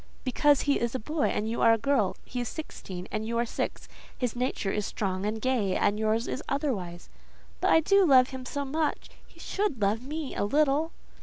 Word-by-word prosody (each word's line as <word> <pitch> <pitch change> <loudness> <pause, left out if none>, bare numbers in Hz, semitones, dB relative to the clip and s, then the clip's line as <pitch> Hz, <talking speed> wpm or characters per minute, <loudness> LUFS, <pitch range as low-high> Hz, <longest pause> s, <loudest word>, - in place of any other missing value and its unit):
"Because 285 +2 +3
he 285 - +2
is 235 +1 -1
a - - -1
boy 300 +7 -1
and 210 - -1
you 230 - -2
are 230 - +6
a - - +3
girl; 230 -4 +1
he 250 - -5
is 240 - -3
sixteen 190 - -7
and 215 - -2
you 230 +2 -3
are - - +3
only - - 0
six; - - -4 0.3
his 250 -3 -2
nature 245 -5 -1
is 210 - -1
strong 195 -1 -2
and 220 +1 -2
gay, 220 -6 +1
and 205 +1 +1
yours 220 +2 +1
is 265 - -3
otherwise." 200 - -2 0.5
"But 320 +3 +3
I - - +7
love 265 -9 +6
him 260 -1 -7
so 280 +3 -3
much; 305 +3 -2 0.2
he - - -21
should 400 - -2
love 210 +2 +1
me 295 +2 -5
a - - -1
little." 295 +7 +2
250 Hz, 215 wpm, -28 LUFS, 215-285 Hz, 0.5 s, I